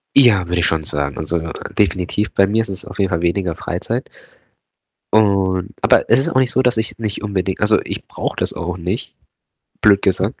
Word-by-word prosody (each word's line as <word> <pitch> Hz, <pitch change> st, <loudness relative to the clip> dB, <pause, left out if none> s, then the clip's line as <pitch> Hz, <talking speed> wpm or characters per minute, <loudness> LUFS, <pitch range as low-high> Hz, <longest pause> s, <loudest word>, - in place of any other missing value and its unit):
Ja, 110 Hz, -10 st, +6 dB
würde 90 Hz, 0 st, 0 dB
ich 85 Hz, -, +3 dB
schon 80 Hz, -1 st, +1 dB
sagen. 70 Hz, -1 st, -2 dB
Also, 80 Hz, +2 st, -1 dB, 0.4 s
definitiv 100 Hz, +1 st, 0 dB
bei 100 Hz, 0 st, +4 dB
mir 110 Hz, +3 st, +2 dB
ist 110 Hz, -, -4 dB
es 95 Hz, 0 st, -6 dB
auf -, -, -10 dB
jeden 95 Hz, -2 st, +2 dB
Fall 85 Hz, -2 st, -1 dB
weniger 85 Hz, 0 st, 0 dB
Freizeit. -, -, -4 dB, 1.0 s
Und 95 Hz, -4 st, +2 dB
aber -, -, +3 dB
es 120 Hz, -, +5 dB
ist 135 Hz, -, 0 dB
auch 130 Hz, -, +2 dB
nicht 130 Hz, -1 st, +2 dB
so, 130 Hz, -, +2 dB
dass 125 Hz, -3 st, +2 dB
ich 110 Hz, +1 st, -2 dB
nicht 110 Hz, -1 st, -3 dB
unbedingt 95 Hz, -2 st, -2 dB
also, -, -, +4 dB
ich -, -, -6 dB
brauche -, -, -4 dB
das -, -, -1 dB
auch 85 Hz, +1 st, -4 dB
nicht, 90 Hz, +6 st, -4 dB, 0.7 s
blöd 100 Hz, -2 st, +5 dB
gesagt. 95 Hz, +4 st, 0 dB
95 Hz, 200 wpm, -19 LUFS, 90-110 Hz, 1.0 s, Ja